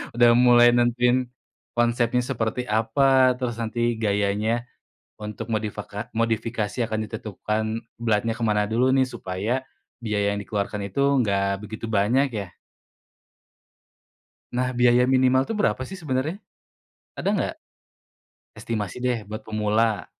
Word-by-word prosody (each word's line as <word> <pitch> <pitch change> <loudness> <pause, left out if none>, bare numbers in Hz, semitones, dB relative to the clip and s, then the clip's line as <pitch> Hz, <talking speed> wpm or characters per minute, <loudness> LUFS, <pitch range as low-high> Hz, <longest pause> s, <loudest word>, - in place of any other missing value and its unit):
udah 120 0 +6
mulai 120 -1 +6
nentuin 120 +1 +2 0.4
konsepnya 120 +1 +2
seperti 125 -1 -2
apa, 130 +4 +3
terus 120 -3 -2
nanti 120 +1 -1
gayanya 105 +2 0 0.5
untuk 105 +1 -6
modifaka 105 0 -4
modifikasi 115 -1 -1
akan 110 -1 -2
ditentukan 110 0 -3 0.4
beratnya 115 0 +1
kemana 105 -3 +1
dulu 125 +4 +2
nih, 130 -1 +3
supaya 110 +5 -3 0.4
biaya 100 -2 0
yang - - -3
dikeluarkan 100 +1 -3
itu 140 - -1 0.2
enggak 100 -3 +1
begitu 110 +2 -6
banyak 115 +6 +2 0.2
ya? - - -11 2.1
Nah, 125 +1 0
biaya 125 +1 +4
minimal 130 0 +4
tuh 225 - -2
berapa 125 - +1
sih 190 - -7
sebenarnya? 150 +1 -2 0.8
Ada - - -3
nggak? - - -1 1.0
estimasi 110 0 -4
deh 120 -4 -1
buat 110 +1 -7
pemula. 110 -1 0
115 Hz, 120 wpm, -24 LUFS, 105-125 Hz, 2.1 s, udah